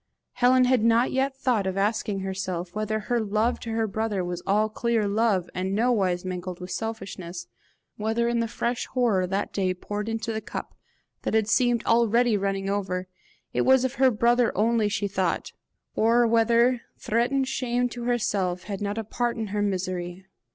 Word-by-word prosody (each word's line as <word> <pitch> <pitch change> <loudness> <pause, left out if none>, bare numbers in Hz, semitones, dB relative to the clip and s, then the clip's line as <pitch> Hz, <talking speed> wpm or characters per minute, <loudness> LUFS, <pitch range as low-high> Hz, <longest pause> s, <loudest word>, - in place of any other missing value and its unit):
Helen 255 +1 +4
had 250 -3 +3
not 230 +2 +3
yet 265 +1 0
thought 235 -8 +1
of 190 0 -2
asking 205 -1 0
herself 185 -2 -4
whether 215 0 -2
her 240 +3 0
love 220 +2 0
to 230 - -7
her 225 0 0
brother 210 -2 -2
was 175 0 -4
all 210 +2 +3
clear 225 0 0
love, 205 -3 +1
and 190 +2 -2
nowise 200 -6 +1
mingled 180 0 -5
with 180 0 -7
selfishness 190 -6 -5 0.5
whether 225 +2 0
in 235 0 +1
the 230 - 0
fresh 235 +1 -2
horror 215 -8 +2
that 195 +2 -2
day 185 -2 0
poured 205 +4 -4
into 225 0 -2
the 220 - -3
cup - - -6 0.5
that - - -1
had 220 -2 +2
seemed 240 0 +2
already 235 0 +3
running 195 -1 -1
over, 185 -2 -2 0.5
it - - +1
was 260 0 +4
of 260 - -1
her 265 - +7
brother 240 +1 +3
only 220 0 +2
she 205 -1 -1
thought, 190 -2 -1 0.4
or 235 +2 +4
whether 235 +2 +3 0.2
threatened 250 +4 0
shame 245 -2 0
to 240 0 -6
herself 200 -7 0
had 200 -2 -5
not 205 +1 -2
a 225 - -1
part 235 +2 -2
in 220 -2 -3
her 205 +1 -1
misery. 185 -2 -3
220 Hz, 180 wpm, -26 LUFS, 195-235 Hz, 0.5 s, her